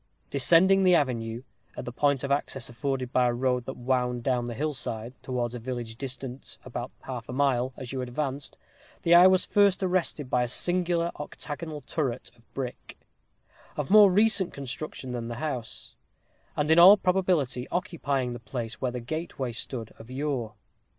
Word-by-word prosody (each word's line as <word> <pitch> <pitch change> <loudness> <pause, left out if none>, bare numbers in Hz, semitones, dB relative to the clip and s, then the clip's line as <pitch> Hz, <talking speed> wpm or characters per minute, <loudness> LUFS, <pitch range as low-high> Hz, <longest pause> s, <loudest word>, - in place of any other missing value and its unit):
Descending 175 +8 +5
the 185 -2 +5
avenue, 120 -5 -1 0.3
at - - -5
the 125 - -5
point 140 +2 +1
of 140 - -2
access 135 -3 -2
afforded 130 +1 -3
by 125 -1 +4
a 120 - +1
road 125 0 0
that 130 - -5
wound 125 -1 0
down 125 -2 +1
the 120 -1 -5
hill 150 +3 -1
side, 115 -2 -5
towards 125 -2 -2
a 125 - -5
village 120 -1 -5
distant 130 +1 -6
about 120 -1 -5
half 125 -3 -7
a - - -3
mile, 130 -1 +1
as 125 -2 -7
you 130 - -2
advanced, 135 +2 -3 0.5
the 170 - +4
eye 175 +2 +9
was 185 0 +4
first 200 -1 +3
arrested 180 -6 0
by 125 0 +1
a 125 - +1
singular 175 +4 +1
octagonal 150 +1 -6
turret 130 -3 -3
of 115 -1 -28
brick, 130 -2 -6 0.8
of 150 +2 -3
more 210 -2 +8
recent 205 -1 +4
construction 135 -1 -6
than 120 -2 -4
the 120 - -5
house; 130 -4 -5 0.6
and 150 +1 +1
in 160 - +7
all 190 +4 +10
probability 180 -10 +1
occupying 140 -9 -2
the 120 - -7
place 115 0 -6
where 130 - +1
the 125 - -4
gateway 140 -1 -4
stood 115 0 -4
of 110 - -12
yore. 130 -5 -3
130 Hz, 175 wpm, -27 LUFS, 120-160 Hz, 0.8 s, all